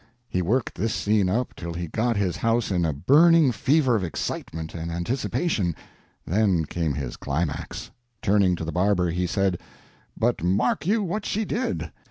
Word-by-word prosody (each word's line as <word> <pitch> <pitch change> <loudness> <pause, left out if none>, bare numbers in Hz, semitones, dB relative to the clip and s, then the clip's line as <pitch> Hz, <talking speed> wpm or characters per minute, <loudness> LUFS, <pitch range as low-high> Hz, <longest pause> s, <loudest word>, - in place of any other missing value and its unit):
He 90 - -1
worked 110 +8 0
this 105 +4 -1
scene 105 -3 +2
up 120 +6 -1
till 85 -1 -6
he 85 0 -3
got 115 +6 0
his 95 -3 0
house 115 0 +1
in 90 -2 +1
a 80 - +1
burning 150 - +5
fever 130 +2 +2
of 105 - 0
excitement 80 -1 -4
and 85 0 -5
anticipation, 95 - -1 0.5
then 95 -3 +2
came 80 -3 -2
his 65 -4 -4
climax. 70 +1 -3 0.3
Turning 100 -3 +3
to 80 - -5
the 80 - -3
barber, 90 -1 +2
he 90 +1 -1
said: 95 -1 0 0.6
"But - - 0
mark 95 - +1
you 215 +2 +2
what 200 +3 -2
she 215 +2 -1
did. 245 +6 -2
95 Hz, 170 wpm, -25 LUFS, 85-120 Hz, 0.6 s, burning